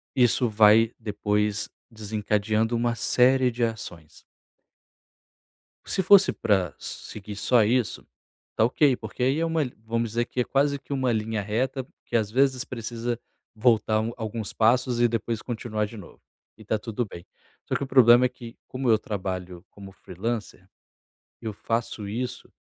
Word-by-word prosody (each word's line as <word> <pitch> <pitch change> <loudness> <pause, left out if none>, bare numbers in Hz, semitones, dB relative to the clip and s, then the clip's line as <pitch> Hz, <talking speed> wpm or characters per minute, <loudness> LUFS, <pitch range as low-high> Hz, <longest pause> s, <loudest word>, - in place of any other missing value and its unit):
isso 125 -1 +3
vai 110 +2 +5
depois 105 -1 -1 0.2
desencadeando 110 +1 -1
uma 120 0 0
série 130 +3 +3
de 120 0 -2
ações. 90 -8 -5 1.6
Se 190 - -1
fosse 195 +1 +6
pra 95 -8 0
seguir 105 -1 -8
só 110 +3 +3
isso, 120 +1 0 0.5
tá 110 - +3
ok, 130 +1 +3
porque 110 +3 -5
aí 135 +5 +2
é 165 - +1
uma 165 -2 +1
li 125 - -7
vamos 115 0 -1
dizer 120 +2 -1
que 130 - -6
é - - +4
quase 140 +2 +1
que 140 - -7
uma 130 -2 +1
linha 110 -1 -1
reta, 125 +6 -2 0.2
que 120 - -5
às 110 -3 +2
vezes 130 +1 +2
precisa 120 0 -4 0.4
voltar 110 -1 +3
um 115 +2 -2
alguns 110 -2 -5
passos 120 +2 +2
e 120 - +6
depois 115 -1 -2
continuar 110 -3 -3
de 115 - -11
novo. 95 - -13 0.4
E - - -14
tá 110 - 0
tudo 115 +2 -3
bem, 85 -3 -11 0.4
só - - -2
que - - -1
o - - -4
problema 125 -1 +6
é - - +2
que, 120 -2 -11
como 130 -1 -2
eu 110 -1 +5
trabalho 95 -3 -5
como 100 -1 -11
freelancer, 100 0 -5 0.7
eu 110 -2 -4
faço 115 -1 -3
isso 125 +3 -5
115 Hz, 160 wpm, -25 LUFS, 105-125 Hz, 1.6 s, fosse